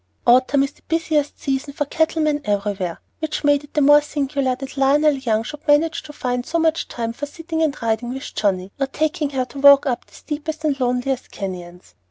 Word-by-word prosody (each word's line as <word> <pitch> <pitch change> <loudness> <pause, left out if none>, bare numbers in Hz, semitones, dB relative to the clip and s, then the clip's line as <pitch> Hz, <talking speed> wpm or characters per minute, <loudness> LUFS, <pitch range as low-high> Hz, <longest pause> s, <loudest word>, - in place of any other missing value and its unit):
Autumn 255 +3 +4
is 275 - -2
the - - -27
busiest 315 -3 0
season 275 +1 -2
for 295 - -1
cattlemen 310 0 0
everywhere, 200 -5 -2 0.2
which 315 -1 -3
made 290 0 +3
it 290 - -17
the 300 - +3
more 290 +1 +7
singular 280 -3 -1
that 270 +2 -8
Lionel 290 +2 +4
Young 230 -5 0
should 300 +6 -9
manage 315 +3 +3
to 305 - -11
find 250 -4 -2
so 335 - -2
much 325 -1 +1
time 230 -1 -4
for 290 +5 -5
sitting 325 +1 -4
and 300 -3 0
riding 230 +2 -1
with 265 +1 -7
Johnnie, 190 -2 -1
or 275 - +1
taking 310 +2 -1
her 265 -2 -1
to 275 +3 -10
walk 280 0 +7
up 250 -4 -2
the - - -20
steepest 315 +1 -5
and 285 -3 0
loneliest 250 +1 -1
canyons. 180 -2 -7
280 Hz, 205 wpm, -21 LUFS, 245-300 Hz, 0.2 s, more